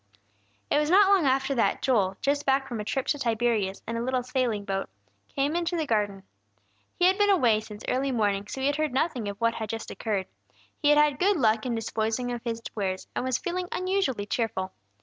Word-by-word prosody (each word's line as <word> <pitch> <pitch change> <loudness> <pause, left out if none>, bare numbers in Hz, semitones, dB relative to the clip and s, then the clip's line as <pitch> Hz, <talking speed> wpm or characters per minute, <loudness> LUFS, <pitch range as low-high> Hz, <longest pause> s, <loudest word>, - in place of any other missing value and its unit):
It - - +4
was 300 0 0
not 390 +2 +6
long 360 -8 +3
after 265 +1 +2
that 235 - +1
Joel, 200 -8 +2
just 285 +1 +1
back 270 0 +2
from 235 -4 -4
a - - -2
trip 260 +5 -2
to 290 - 0
Tiberias 225 -5 0
in 230 +1 -2
a - - -2
little 255 +1 0
sailing 245 -5 -1
boat, 195 -1 -2 0.4
came 285 +3 -1
into 345 0 0
the 320 - 0
garden. 205 -5 -1 0.7
He 355 - +2
had 380 +2 +4
been 410 0 +4
away 245 - +4
since 215 -1 -10
early 270 +2 0
morning, 205 -4 0
so 265 +5 -5
had 285 +1 +1
heard 310 -3 -1
nothing 260 -6 0
of 200 - -6
what 230 0 +2
had 220 -2 -5
just 225 0 -5
occurred; 205 -4 -2 0.6
he 290 - +4
had 295 - +6
had 295 -2 +3
good 390 +1 +3
luck 220 -3 +2
in 240 - -1
disposing 225 +2 -2
of 240 -1 -4
his 230 -1 -4
wares, 190 -3 -3
and - - -1
was 255 -1 0
feeling 360 0 -3
unusually 370 - 0
cheerful. 205 -4 -2
245 Hz, 215 wpm, -27 LUFS, 220-290 Hz, 0.7 s, not